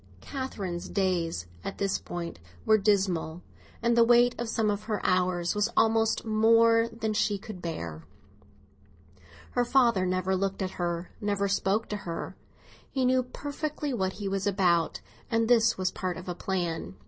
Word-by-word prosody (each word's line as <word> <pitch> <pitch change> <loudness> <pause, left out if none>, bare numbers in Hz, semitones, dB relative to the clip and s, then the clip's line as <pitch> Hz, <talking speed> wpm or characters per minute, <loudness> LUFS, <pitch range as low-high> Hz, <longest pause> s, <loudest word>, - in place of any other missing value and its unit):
Catherine's 200 -11 -5
days 175 - 0 0.2
at - - -5
this 195 -1 0
time 170 -1 -5 0.3
were 220 0 +5
dismal, 190 -5 +1 0.4
and 235 0 +3
the 235 - +6
weight 240 +1 +5
of 235 -1 -3
some 220 -2 +1
of 205 +1 -4
her 215 -2 -1
hours 180 -1 +1
was 210 +2 +1
almost 225 0 +3
more 230 +1 +4
than 220 -1 -2
she 210 -1 +1
could 195 -2 -9
bear. 85 - -5 1.5
Her 245 - +2
father 235 -7 +3
never 185 +1 0
looked 195 +1 -1
at 185 - -3
her, 175 -1 -3
never 200 -1 0
spoke 200 +2 0
to 210 - -2
her. 170 -5 -6 0.5
He 265 -2 0
knew 255 0 +4
perfectly 290 +3 -4
what 190 -5 -1
he 205 -1 -5
was 195 0 -1
about, 180 -4 +2 0.3
and 230 -1 +1
this 230 -1 +4
was 185 0 0
part 185 -2 -3
of 185 - -9
a 180 - -2
plan. 170 - -3
200 Hz, 160 wpm, -28 LUFS, 180-230 Hz, 1.5 s, the